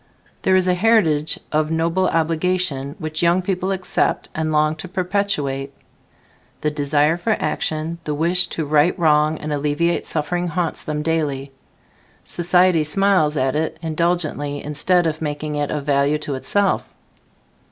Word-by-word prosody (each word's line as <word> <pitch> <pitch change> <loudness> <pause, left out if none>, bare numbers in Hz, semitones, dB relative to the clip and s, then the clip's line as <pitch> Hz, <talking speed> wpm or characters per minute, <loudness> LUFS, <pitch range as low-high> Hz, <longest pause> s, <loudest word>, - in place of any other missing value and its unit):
There 190 - +3
is 185 0 +3
a 180 - +4
heritage 180 -7 +2
of 155 0 +1
noble 165 +3 +1
obligation 165 -3 0
which 155 -4 -4
young 175 +2 +3
people 185 0 -1
accept 190 -1 -1
and 155 0 -2
long 155 0 +2
to 170 - -7
perpetuate. 180 -8 -2 0.9
The 150 - 0
desire 150 +2 +1
for 215 +5 0
action, 160 +2 -2
the 150 -1 -2
wish 175 +3 +2
to 160 - -1
right 150 +5 +3
wrong 155 -2 +3
and 150 0 -4
alleviate 150 +4 0
suffering 175 +3 -1
haunts 170 -1 -2
them 150 -1 -3
daily. 145 -4 -1 0.7
Society 175 -1 +3
smiles 155 -2 +2
at 130 +1 +1
it 160 +1 -1
indulgently 155 -3 -1
instead 175 +4 +1
of 160 -1 -2
making 150 0 -3
it 145 -1 -1
of 145 -2 -3
value 140 +1 +2
to 150 -1 -5
itself. 200 +9 0
155 Hz, 145 wpm, -21 LUFS, 150-180 Hz, 0.9 s, a